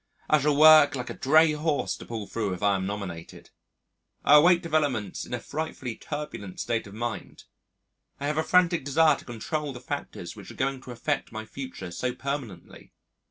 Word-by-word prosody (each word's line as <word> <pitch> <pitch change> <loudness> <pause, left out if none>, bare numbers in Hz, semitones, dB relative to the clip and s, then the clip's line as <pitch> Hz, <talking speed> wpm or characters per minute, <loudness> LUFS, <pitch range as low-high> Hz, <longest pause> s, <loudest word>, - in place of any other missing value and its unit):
I 155 - +4
shall 145 0 +2
work 155 -2 +8
like 125 -1 -5
a - - -4
drayhorse 155 -1 +2
to - - -11
pull 115 -3 -5
through 105 -3 -3
if 90 - -9
I 100 -1 +4
am 95 0 -2
nominated.... 95 -5 -7 0.7
I 150 - +8
await 175 +3 +5
developments 145 - -1
in - - -8
a - - -5
frightfully 135 -3 -5
turbulent 145 -11 -7
state 115 -3 -2
of 100 - -11
mind. 120 -1 -5 0.8
I 140 - -4
have 150 +2 0
a - - +1
frantic 175 -2 +3
desire 155 +3 +4
to - - -14
control 140 +5 -4
the 125 - -8
factors 125 -10 -6
which 100 -3 -11
are - - -10
going 135 0 -1
to 130 - -10
affect 130 +4 -2
my 110 0 -6
future 120 -7 -8
so 125 +7 -3
permanently. 130 -10 -6
135 Hz, 185 wpm, -27 LUFS, 110-150 Hz, 0.8 s, work